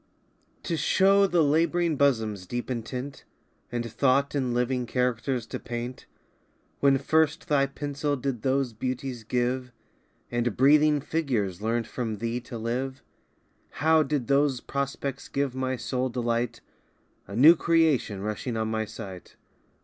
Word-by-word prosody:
TO 170 -3 -2
show 195 +6 +4
the 175 -3 +3
lab'ring 165 +2 +2
bosom's 110 -9 +1
deep 120 +3 -4
intent, 125 +3 -5 0.5
And 120 -1 -3
thought 140 +3 +2
in 130 -4 0
living 125 +1 0
characters 125 0 -1
to - - -6
paint, 120 +2 -6 0.7
When 140 -1 +4
first 155 +2 +1
thy 140 -2 +3
pencil 145 +1 -2
did 130 -3 -3
those 135 -2 0
beauties 125 +1 -4
give, 125 +2 -1 0.6
And 120 -2 -1
breathing 150 +2 +5
figures 120 - -1
learnt 115 +1 0
from 110 -2 -4
thee 115 +3 -2
to 120 0 -8
live, 125 +4 -3 0.7
How 160 +1 +3
did 145 -3 -1
those 140 -1 +2
prospects 140 0 -4
give 140 -2 -1
my 130 0 -1
soul 125 +2 -2
delight, 120 -1 -1 0.7
A 100 - -7
new 150 +8 +8
creation 155 - +2
rushing 110 +3 -3
on 110 0 -1
my 110 0 -1
sight? 95 -4 -9
130 Hz, 135 wpm, -27 LUFS, 120-140 Hz, 0.7 s, new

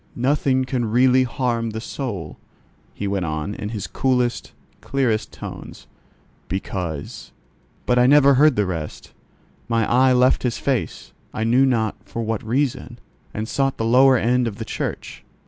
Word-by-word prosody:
"Nothing 130 0 +1
can 130 -3 -1
really 130 +2 +4
harm 120 -2 -1
the 110 0 -5
soul," 105 - -6 0.5
he 100 - -5
went 100 -1 -1
on, 80 +5 -3
in, 105 - -5
his 105 -3 -5
coolest, 125 -2 -1 0.3
clearest 115 -6 -1
tones, - - -9 0.6
"because——" 90 -4 -5 0.5
But 125 0 +2
I 125 - +5
never 140 0 +6
heard 145 +1 +5
the 105 - +1
rest; 80 -5 -6 0.6
my 115 -2 +1
eye 130 +2 +4
left 125 +1 +3
his 125 -3 -1
face, 135 -4 -3 0.2
I 110 - -1
knew 125 +4 +4
not 115 -4 0
for 115 - -5
what 110 -1 -2
reason, 130 +4 -2 0.3
and 110 +1 -4
sought 135 +2 -1
the 115 - -2
lower 130 +3 +5
end 125 +1 +1
of 110 - -4
the - - -6
church. - - -5
120 Hz, 155 wpm, -21 LUFS, 110-130 Hz, 0.6 s, never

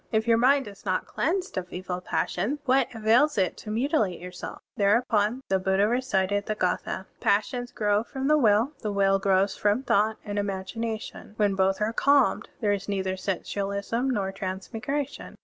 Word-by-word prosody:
If 220 +1 +1
your 230 -1 +4
mind 270 +1 +4
is 200 -1 -12
not 185 -2 -1
cleansed 365 - -2
of 180 -1 -9
evil 180 0 -4
passions, 205 +8 -1
what 265 -1 +3
avails 230 +7 +3
it 190 -2 +1
to 215 - -9
mutilate 220 - 0
yourself?*" 180 0 -8
Thereupon, 215 +3 +2
the 190 0 +1
Buddha 190 +2 +2
recited 205 -5 0
the 215 - -1
gS 180 -3 0
thd, 190 - -5
"Passions 245 +4 0
grow 205 -1 +1
from 265 +3 -4
the 305 - +5
will, 230 -1 +3
The 210 - -3
will 195 -1 +3
grows 195 0 +2
from 210 +5 +1
thought 220 -2 +2
and 205 -1 -2
imagination:, 210 +2 -4
When 205 -2 +2
both 190 0 +1
are 215 +2 0
calmed, 280 +3 +3
There 205 -2 +2
is 200 0 -4
neither 190 -1 -1
sensualism 200 +5 -2
nor 200 -6 -1
transmigration. 200 +9 -4
205 Hz, 170 wpm, -26 LUFS, 195-240 Hz, -, the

